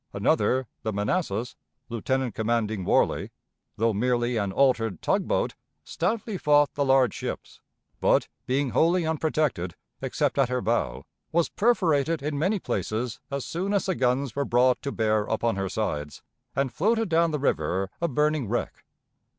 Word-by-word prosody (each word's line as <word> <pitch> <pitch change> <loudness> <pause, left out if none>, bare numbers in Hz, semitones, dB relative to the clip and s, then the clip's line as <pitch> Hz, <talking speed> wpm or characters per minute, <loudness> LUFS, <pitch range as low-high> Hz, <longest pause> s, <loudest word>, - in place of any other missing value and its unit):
Another, 130 +1 +2 0.2
the 110 - -2
Manassas, 110 - -1 0.3
lieutenant 130 +1 -1
commanding 110 -2 -1
Warley, - - +2 0.5
though 115 0 +2
merely 120 +2 +1
an 100 -3 0
altered 115 - +2
"tug - - 0
boat," - - 0 0.3
stoutly 210 +2 -2
fought 145 -1 +4
the 145 - 0
large 135 -2 +4
ships; - - -6 0.4
but, - - +3 0.2
being 135 0 +1
wholly 170 +1 +3
unprotected, 155 - -1 0.3
except - - 0
at 135 -3 +3
her 125 0 0
bow, 115 - -1 0.3
was 170 0 +2
perforated 165 - +2
in 145 -1 -2
many 190 +7 +2
places, 110 - -3
as 140 -1 -3
soon 190 +5 -2
as 200 - +1
the 190 - +1
guns 130 -3 0
were 140 - +1
brought 125 0 +3
to 140 - -3
bear 110 -3 +1
upon 115 0 0
her 95 -1 -2
sides, 75 -10 -3 0.3
and 135 -2 0
floated 225 +5 +1
down 170 -1 +3
the 155 - -1
river 95 - 0
a 170 - +2
burning 150 -2 +1
wreck. 120 - -3
130 Hz, 155 wpm, -26 LUFS, 110-155 Hz, 0.5 s, fought